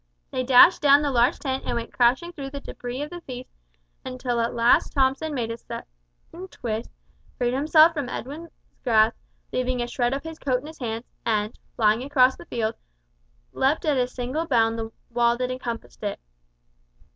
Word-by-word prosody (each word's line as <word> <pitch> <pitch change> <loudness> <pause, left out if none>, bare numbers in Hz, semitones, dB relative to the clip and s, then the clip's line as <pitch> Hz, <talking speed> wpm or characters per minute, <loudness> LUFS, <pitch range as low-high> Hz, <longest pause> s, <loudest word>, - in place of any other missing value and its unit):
They 255 - -1
dashed 255 +7 +7
down 285 0 +6
the 285 - 0
large 245 +3 +3
tent 265 -2 -3
and - - -2
went 235 -1 -4
crashing 260 +8 +2
through 275 -4 -6
the 280 +1 -6
debris 250 0 -6
of 300 - -7
the 350 0 -7
feast 255 -4 -9 0.5
until 255 -2 -3
at 230 0 -1
length 235 +1 +3
Thomson 270 +3 +1
made 240 -5 -2
a 230 - -6
sudden - - -7 0.6
twist 225 -6 -4 0.5
freed 245 -1 0
himself 310 +4 +5
from 290 -6 -3
Edwin's 295 +8 -6 0.3
grasp, 225 -2 +4 0.4
leaving 255 0 0
a 240 - 0
shred 245 +1 0
of 275 - -5
his 320 0 -8
coat 255 -3 0
in - - -13
his 315 +1 -11
hands, 230 -1 -4 0.2
and, 215 -1 0 0.2
flying 215 0 +3
across 260 -1 +4
the - - -13
field, 225 -1 -2 0.8
leaped 275 +5 +1
at 300 -2 +2
a 250 -1 +1
single 255 +6 -3
bound 230 -4 +2
the 225 0 -5 0.2
wall 235 0 +2
that 250 0 -2
encompassed 245 -2 -6
it. 205 -2 -3
255 Hz, 180 wpm, -25 LUFS, 235-280 Hz, 0.8 s, dashed